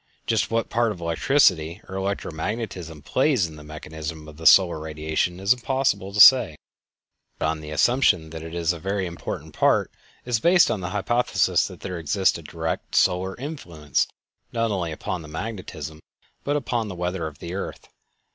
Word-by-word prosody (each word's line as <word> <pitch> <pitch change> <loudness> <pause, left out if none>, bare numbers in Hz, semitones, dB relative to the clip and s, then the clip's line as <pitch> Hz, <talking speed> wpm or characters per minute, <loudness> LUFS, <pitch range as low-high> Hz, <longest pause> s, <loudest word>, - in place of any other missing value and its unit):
Just 110 -2 +1
what 115 0 -1
part 120 -1 +2
electricity 85 - +2
or - - -9
electro 95 0 -2
magnetism 80 -3 -5
plays 130 - +2
in 80 -2 -8
the 75 - -12
mechanism 75 0 -7
of 75 -1 -12
the 80 - +1
solar 90 -4 +6
radiation 80 +3 -2
it - - -10
is 100 - +5
impossible 125 -6 -1
to 105 - -3
say, 120 -8 +8 0.8
but - - -2
on 80 0 0
the 75 -1 -9
assumption 80 - +2
that 80 -1 -7
it 80 +1 -8
is 85 0 +1
a 85 - -8
very 95 +2 -2
important 85 -1 -6
part - - +2 0.3
is 120 -2 0
based 175 +6 +5
the 115 - 0
hypothesis 110 +5 +1
that - - -12
there 90 -3 -5
exists 90 +3 +1
a - - -10
direct 80 +1 -4
solar 95 +1 +2
influence 90 - -2 0.4
not 115 -1 0
only 90 -5 -2
upon 85 +3 -4
the 75 - -10
magnetism, 80 -4 -6 0.4
but 145 - 0
upon 120 -5 -1
the 95 - -6
weather 90 -1 -2
of 75 -2 -10
the 85 +1 -7
earth. 100 - -6
90 Hz, 175 wpm, -24 LUFS, 80-110 Hz, 0.8 s, say